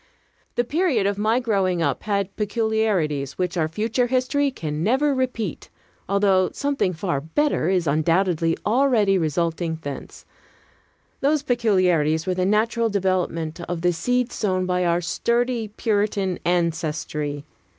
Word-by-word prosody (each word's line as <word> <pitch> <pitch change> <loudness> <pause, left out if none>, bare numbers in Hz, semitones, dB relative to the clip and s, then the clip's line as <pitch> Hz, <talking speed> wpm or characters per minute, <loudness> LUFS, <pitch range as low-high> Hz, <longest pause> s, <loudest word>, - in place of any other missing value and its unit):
The 240 - +2
period 285 - +1
of 200 0 0
my 220 +3 +2
growing 195 -7 0
up 140 -4 0
had 200 -2 -2
peculiarities 210 - 0
which 180 0 -1
our 160 -3 +1
future 220 +8 0
history 260 +3 +1
can 155 - -4
never 265 - +2
repeat, 250 - -3 0.4
although 195 -2 +3
something 280 -9 0
far 165 -4 -2
better 170 - 0
is 185 -3 +1
undoubtedly 165 +2 +1
already 215 -5 +3
resulting 165 +1 -1
thence. 140 -1 -7 0.9
Those 295 +1 +1
peculiarities 185 - +2
were 185 - 0
the 185 0 0
natural 225 +3 +1
development 180 -4 -1
of 175 -2 -3
the 175 0 +2
seed 245 +8 0
sown 185 -3 -1
by 180 0 0
our 170 +1 +2
sturdy 235 +5 0
Puritan 205 -3 -1
ancestry. 155 -4 -1
190 Hz, 130 wpm, -23 LUFS, 165-230 Hz, 0.9 s, although